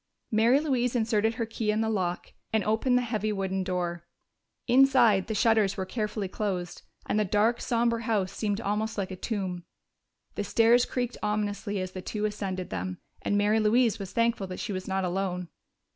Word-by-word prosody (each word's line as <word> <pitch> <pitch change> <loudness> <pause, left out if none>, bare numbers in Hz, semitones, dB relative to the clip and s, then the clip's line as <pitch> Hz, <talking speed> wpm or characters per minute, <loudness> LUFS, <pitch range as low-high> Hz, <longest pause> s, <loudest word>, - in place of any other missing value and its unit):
Mary 230 +5 +4
Louise 255 -5 0
inserted 220 -1 +1
her 230 - -1
key 220 -1 -3
in 215 +1 +2
the 225 - 0
lock 185 -4 -2 0.2
and 220 -1 +2
opened 225 +4 +2
the 250 - +1
heavy 215 -2 -1
wooden 190 -1 -1
door. 175 -2 -2 0.6
Inside, 245 -6 +5
the 220 - -2
shutters 220 -2 +3
were 190 - -2
carefully 210 -1 -3
closed, 185 -3 -3 0.2
and 210 - 0
the - - +3
dark, 210 +4 +2
somber 235 -1 +1
house 215 -5 0
seemed 205 0 -2
almost 215 +1 -2
like 195 -1 -2
a - - -4
tomb. 185 -3 -3 0.7
The 205 - -3
stairs 230 +3 +4
creaked 245 -1 -2
ominously 210 -1 -1
as 185 0 -4
the 185 - -6
two 210 +3 -3
ascended 195 -3 -3
them, 90 0 -3 0.2
and 205 - 0
Mary 210 +2 +3
Louise 220 +1 +3
was 195 -2 -6
thankful 230 -4 +1
that 185 - -7
she 205 - -3
was 185 0 -5
not 190 0 0
alone. 180 -1 -2
210 Hz, 185 wpm, -28 LUFS, 190-225 Hz, 0.7 s, Inside